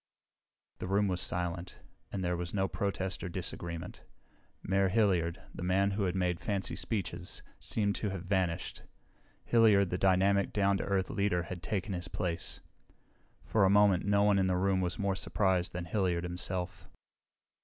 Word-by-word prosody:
The - - -4
room 100 +2 +2
was 90 -2 0
silent, 90 0 -3 0.3
and 95 - -3
there 90 0 0
was 85 +2 -4
no 95 -1 +2
protest 95 -1 -2
or 90 - -3
disagreement. 85 -1 -5 0.6
Mayor 95 0 +2
Hilliard, 90 -5 +2
the - - -8
man 95 +2 +2
who 100 0 0
had 90 0 -1
made 90 -2 0
fancy 100 -2 -2
speeches, 90 -5 -4 0.2
seemed 100 -2 0
to 105 - -1
have 95 -2 -5
vanished. 95 -3 -1 0.6
Hilliard, 105 -5 +5
the 90 - -1
dynamic, 95 +1 +3
down 100 -1 +3
to - - -2
earth 95 -2 0
leader 100 -3 +1
had 90 0 -7
taken 100 +2 -2
his 90 0 -4
place. 90 -1 -3 0.8
For 110 - +2
a 95 - +5
moment 100 -2 +5
no 100 0 +3
one 105 -1 +4
in 95 - +2
the 90 -1 +1
room 95 0 +2
was 90 -1 -2
more 100 -2 0
surprised 95 -3 +1
than 90 -1 -4
Hilliard 90 -2 0
himself. 90 +1 -3
95 Hz, 165 wpm, -32 LUFS, 90-100 Hz, 0.8 s, Hilliard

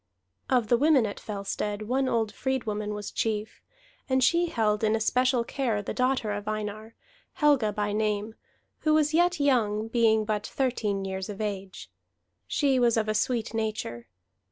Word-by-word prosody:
Of 245 -5 +2
the 240 - +4
women 290 -4 +4
at 205 - -5
Fellstead 205 0 -4
one 260 +4 0
old 225 -2 0
freedwoman 215 -5 -2
was 210 -1 -6
chief; 215 -1 -2 0.5
and 260 0 +3
she 340 +6 +3
held 215 -7 0
in 215 0 +3
especial 250 +2 +2
care 230 -5 -2
the - - -4
daughter 255 -4 0
of 205 0 -4
Einar, 215 +1 -4 0.4
Helga 290 -10 +3
by 205 0 -2
name, 210 0 -1 0.5
who 310 -1 +2
was 305 0 +2
yet 350 +1 +3
young, 225 -6 +2
being 225 -2 +3
but 210 -1 -2
thirteen 215 -7 -1
years 190 0 -4
of 200 - -7
age. 195 - -5 0.6
She 275 -3 +2
was 235 -2 +3
of 220 -1 +1
a 215 - +1
sweet 230 +1 -1
nature. 215 - -3
220 Hz, 160 wpm, -27 LUFS, 210-255 Hz, 0.6 s, the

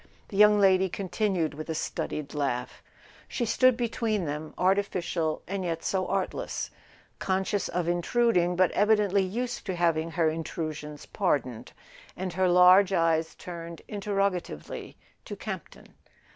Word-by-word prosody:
the - - -8
young 210 +1 +6
lady 190 -1 +4
continued 190 -3 -1
with 155 +3 -8
a 160 - -2
studied 150 -2 -4
laugh. 130 -4 -2 0.5
She 240 - -2
stood 255 +2 +4
between 225 -5 -1
them, 150 +1 -5
artificial 180 -4 0
and 195 +1 -3
yet 165 -2 -3
so 190 -1 -1
artless, 195 -1 -2 0.5
conscious 190 +1 0
of 175 -1 -2
intruding 175 0 +2
but 185 -1 +3
evidently 205 -1 +3
used 240 +6 -3
to 190 - -2
having 165 -2 +1
her 165 -1 +1
intru¬ 160 0 -3
sions 150 -1 -9
pardoned; 140 - -1 0.5
and 185 -1 -4
her 185 0 +2
large 180 +2 +7
eyes 165 -3 +1
turned 170 -2 -8
interrog¬ 200 -1 0
atively 75 - -7 0.3
to - - -6
Campton. - - -8
180 Hz, 140 wpm, -28 LUFS, 165-200 Hz, 0.5 s, large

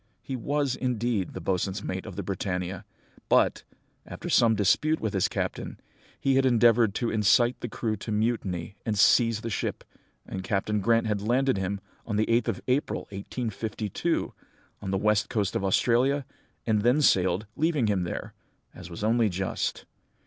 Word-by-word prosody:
He 135 - -4
was, 140 +1 -1
indeed, 120 -6 -1
the - - -5
boatswain's 95 +3 -1
mate 95 +3 -4
of 100 - -8
the - - -4
Britannia; 95 0 -3 0.4
but, - - +3 0.4
after - - -7
some 115 -2 +5
dispute 150 +11 +2
with 110 -2 -2
his 95 -3 +2
captain, - - -4 0.4
he 135 -1 +2
had 135 - +4
endeavoured 115 -4 +4
to 120 - -1
incite 120 +3 +3
the 120 - -5
crew 110 0 -2
to 110 - -6
mutiny 105 -5 -1
and 110 -3 -1
seize 115 +1 +4
the 115 - -4
ship, - - -3 0.4
and 95 - -6
Captain 100 +2 -1
Grant 115 +2 +3
had 105 -2 -1
landed 125 +1 +1
him, 95 +1 -3 0.2
on 105 - -4
the 110 +1 +2
8th 115 +2 +1
of 115 -5 -2
April, 130 +3 0
1852, 105 0 -3 0.5
on 100 - -5
the 95 - +1
west 105 +1 +1
coast 105 -5 -1
of - - -1
Australia, 125 +8 +2 0.4
and 110 -2 +2
then 125 +7 +3
sailed, 95 -2 +3
leaving 155 -5 +1
him 100 -3 +1
there, 85 - -5 0.4
as 90 -1 -10
was 85 +4 -7
only 115 0 +3
just. 95 +1 -3
110 Hz, 170 wpm, -27 LUFS, 95-120 Hz, 0.5 s, some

